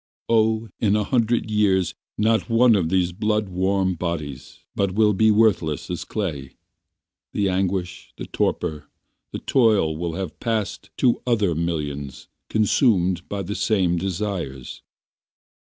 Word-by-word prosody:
Oh 110 Hz, 0 st, +2 dB
in 105 Hz, -2 st, +2 dB
a 105 Hz, -, +1 dB
hundred 115 Hz, -1 st, 0 dB
years 95 Hz, -4 st, +2 dB, 0.2 s
Not 110 Hz, +3 st, +1 dB
one 115 Hz, 0 st, +5 dB
of 85 Hz, -5 st, 0 dB
these 90 Hz, -1 st, +1 dB
blood 105 Hz, +2 st, -1 dB
warm 95 Hz, +1 st, +1 dB
bodies 80 Hz, -6 st, -5 dB
But 100 Hz, -2 st, 0 dB
will 105 Hz, -1 st, +4 dB
be 110 Hz, +3 st, +3 dB
worthless 85 Hz, -7 st, +2 dB
as 90 Hz, -, -4 dB
clay. 75 Hz, -11 st, -4 dB, 0.8 s
The 100 Hz, -1 st, +1 dB
anguish, 90 Hz, -2 st, -2 dB
the -, -, -6 dB
torpor, 75 Hz, -4 st, -2 dB, 0.4 s
the -, -, -4 dB
toil 110 Hz, -, +2 dB
Will 85 Hz, +1 st, -3 dB
have 95 Hz, -3 st, -5 dB
passed 110 Hz, -4 st, -2 dB
to 125 Hz, -3 st, +2 dB
other 105 Hz, -7 st, +2 dB
millions 75 Hz, -5 st, -4 dB, 0.2 s
Consumed 95 Hz, -5 st, +2 dB
by 100 Hz, -1 st, -3 dB
the 100 Hz, +3 st, -4 dB
same 95 Hz, -5 st, +1 dB
desires. 90 Hz, -8 st, -4 dB
95 Hz, 135 wpm, -23 LUFS, 85-110 Hz, 0.8 s, one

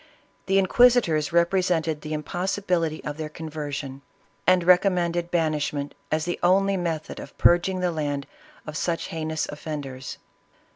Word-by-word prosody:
The 195 Hz, 0 st, +3 dB
Inquisi 245 Hz, +6 st, +5 dB
tors 155 Hz, -2 st, -1 dB
represented 170 Hz, -3 st, +1 dB
the 155 Hz, 0 st, -5 dB
impossibility 175 Hz, 0 st, -1 dB
of 150 Hz, 0 st, -5 dB
their 155 Hz, -1 st, -4 dB
conversion, 150 Hz, -3 st, -6 dB, 0.5 s
and 185 Hz, -1 st, +5 dB
recommended 175 Hz, -1 st, +3 dB
banishment 150 Hz, -4 st, -1 dB, 0.2 s
as 155 Hz, 0 st, 0 dB
the 175 Hz, -, -3 dB
only 195 Hz, +2 st, +3 dB
method 165 Hz, -4 st, -3 dB
of -, -, -10 dB
purging 180 Hz, +2 st, +3 dB
the 180 Hz, -1 st, +1 dB
land 145 Hz, -3 st, -2 dB, 0.4 s
of 155 Hz, -, -7 dB
such 165 Hz, +1 st, -2 dB
heinous 160 Hz, -1 st, -2 dB
offenders. 145 Hz, -4 st, -6 dB
165 Hz, 135 wpm, -25 LUFS, 150-180 Hz, 0.5 s, Inquisi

